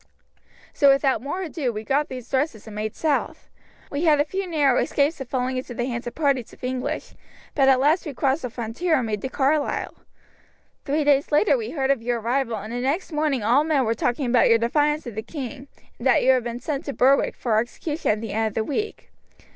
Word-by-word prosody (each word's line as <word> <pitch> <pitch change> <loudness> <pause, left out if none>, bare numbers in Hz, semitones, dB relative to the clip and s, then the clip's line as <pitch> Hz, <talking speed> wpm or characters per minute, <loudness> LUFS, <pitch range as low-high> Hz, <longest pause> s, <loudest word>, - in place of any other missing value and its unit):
So 280 - +5
without 275 -3 +3
more 295 +8 -4
ado 305 -7 -2
we 215 -1 -6
got 285 +6 0
these 255 -2 -7
dresses 260 -5 -1
and 215 -2 -10
made 215 0 -3
south. 310 -3 -2 0.4
We 290 +4 -1
had 300 -2 +5
a 290 - +3
few 380 +5 -3
narrow 290 -7 +2
escapes 290 +1 0
of 260 - -7
falling 255 0 -1
into 255 -1 -5
the 240 - -1
hands 240 -1 -4
of 240 - -6
parties 275 -6 0
of - - -18
English, 255 +4 -3 0.4
but 270 -2 +4
at 260 -1 +5
last 310 +6 +2
we 285 - -6
crossed 275 +4 +1
the 250 - -4
frontier 240 +9 -1
and 250 - -1
made 210 -2 -3
to 265 - -3
Carlisle. 285 +2 0 0.9
Three 295 +2 +1
days 285 0 +2
later 300 +11 +4
we 455 -3 -3
heard 270 -3 0
of 270 -4 0
your 240 0 -1
arrival, 235 0 -1
and 215 +3 -7
the 245 - -2
next 295 +9 -1
morning 300 -6 0
all 245 +7 +4
men 300 -5 +1
were 225 - +1
talking 245 +4 -1
about 245 0 +4
your 230 - +6
defiance 295 +6 +1
of 240 - -6
the 220 - -4
king, 270 +2 -7 0.3
and 240 - -1
that 260 - +4
you 260 - +6
had 255 -2 +2
been 240 0 -4
sent 280 +3 -4
to 280 - -4
Berwick 270 +2 +3
for 220 -3 +1
execution 295 +7 -3
at 210 0 +1
the 225 -3 -5
end 220 +1 +1
of 215 - -5
the 220 - +1
week. 420 - -4
265 Hz, 230 wpm, -24 LUFS, 240-295 Hz, 0.9 s, your